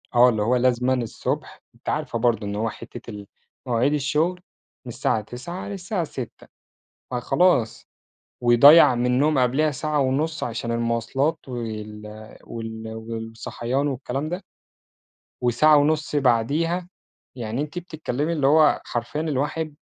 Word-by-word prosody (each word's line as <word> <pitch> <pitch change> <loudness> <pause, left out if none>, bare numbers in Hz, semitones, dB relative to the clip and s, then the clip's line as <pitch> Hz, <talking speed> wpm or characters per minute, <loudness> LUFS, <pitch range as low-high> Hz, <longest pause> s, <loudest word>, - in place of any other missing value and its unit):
آه، 125 +1 +7
اللي 110 -3 0
هو 120 +4 +2
لازمًا 125 +1 +2
الصبح 120 -3 -3
أنتِ - - -7
عارفة 115 - -2
برضه 115 -3 +1
إن 100 - -3
هو 110 +2 -1
حِتة 120 +1 -10
ال 105 -2 -8 0.4
مواعيد 125 +4 +1
الشغل 155 +5 0 0.4
من 125 - -7
الساعة 110 - 0
9:00 125 - -7
للساعة 195 -1 -3
18:00 130 -6 -8 0.6
فخلاص. 125 -2 +1 0.5
ويضيّع 125 +5 +7
منّهم 125 +5 +2
قبليها 135 +5 +2
ساعة 150 +1 -1
ونص 150 +5 0
عشان 115 0 -3
المواصلات، 115 +6 0
وال 110 -3 -6 0.4
وال 110 -1 -7
والصحيان 115 +4 -4
والكلام 135 +2 -3
ده. 175 +4 -4 1.0
وساعة 125 +5 +5
ونص 150 +1 +1
بعديها، 145 +8 +1 0.5
يعني 120 +1 -3
أنتِ 150 +4 -4
بتتكلّمي 155 -3 -3
اللي 145 -4 +1
هو 155 +1 +5
حرفيًا 120 +5 -3
الواحد 155 +1 -2
130 Hz, 125 wpm, -23 LUFS, 115-155 Hz, 1.0 s, آه